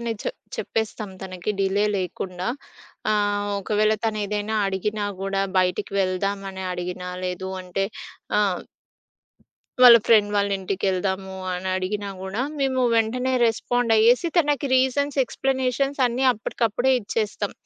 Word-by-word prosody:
అని 235 -1 -2
చెప్ - - -4 0.2
చెప్పేస్తాం 215 -2 -3
తనకి 185 +1 -4
డిలే 195 +2 +2
లేకుండా. 180 0 -4 0.6
ఆహ్, 205 -1 +1
ఒకవేళ 215 +2 +2
తనేదైనా 210 0 -1
అడిగినా 205 +2 -2 0.2
గూడా, 195 0 -1 0.2
"బయటికి 185 +3 0
వెళ్దం" 195 +2 0
అని 190 0 -7
అడిగినా, 180 0 -5 0.2
లేదు 180 +1 -3
అంటే 180 +2 -2 0.5
ఆ! - - +4 1.4
"వాళ్ళ 240 -2 +11
ఫ్రెండ్ 210 -3 +5
వాళ్ళింటికెళ్దాము" 190 -1 -1 0.2
అనడిగినా 185 +2 -2
గూడా, 190 +6 -3 0.2
మేము 260 -1 +1
వెంటనే 250 +3 +1
రెస్పాండయ్యేసి 235 +4 +3
తనకి 290 -3 +2
రీజన్స్, 275 +2 +1
ఎక్స్‌ప్లనేషన్స్ 270 +2 -1
అన్నీ 245 +3 -1
అప్పటికప్పుడే 235 +3 0
ఇచ్చేస్తాం. 205 -1 -2
210 Hz, 110 wpm, -24 LUFS, 190-235 Hz, 1.4 s, వాళ్ళ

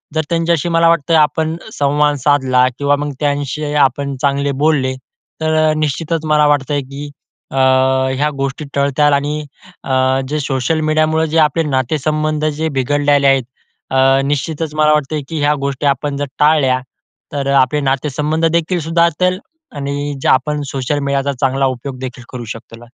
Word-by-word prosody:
जर 160 - +2
त्यांच्याशी 170 -1 0
मला 165 0 +4
वाटतं 165 -1 +2
आपण 160 +2 +1 0.2
संवाद 145 +1 +1
साधला 130 -3 +3
किंवा 145 0 +2
मग 145 0 -3
त्यांच्याशी 145 0 -2
आपण 140 0 +1
चांगले 140 0 +1
बोलले 140 -4 +2 0.5
तर 155 0 +2
निश्चितच 155 +2 -2
मला 150 -1 +3
वाटतंय 145 0 +1
की 140 +2 -8 0.4
अ, - - -7 0.6
ह्या 145 +3 +1
गोष्टी 140 +2 -3
टळतील 140 +1 +2
आणि 145 +2 -1 0.4
अ, 130 0 +1
जे 150 +1 -1
सोशल 140 +3 -1
मीडियामुळं 155 +1 +1
जे 160 +1 -1
आपले 155 +1 +2
नातेसंबंध 155 +2 -1
जे 155 +1 -1
बिघडलेले 145 +1 +2
आहेत, 135 -2 +3 0.8
निश्चितच 150 +2 -2
मला 155 0 +3
वाटतंय 150 0 -1
की 160 - -3
ह्या 145 +1 +3
गोष्टी 140 +1 -2
आपण 140 +1 -1
जर 145 - -2
टाळल्या 150 -4 +3 0.5
तर 140 -1 -2
आपले 130 +4 0
नातेसंबंध 150 +4 -1
देखील 170 +2 0
सुधारतील 170 +3 +1 0.4
आणि 145 0 -3
जे - - -1
आपण 150 +3 +1
सोशल 135 +2 -2
मीडियाचा 140 0 -1
चांगला 135 0 +1
उपयोग 130 +1 -4
देखील 125 -2 -7
करू 125 -2 -7
शकतो 115 +1 -9
त्याला. 120 +1 -14
145 Hz, 150 wpm, -16 LUFS, 135-155 Hz, 0.8 s, मला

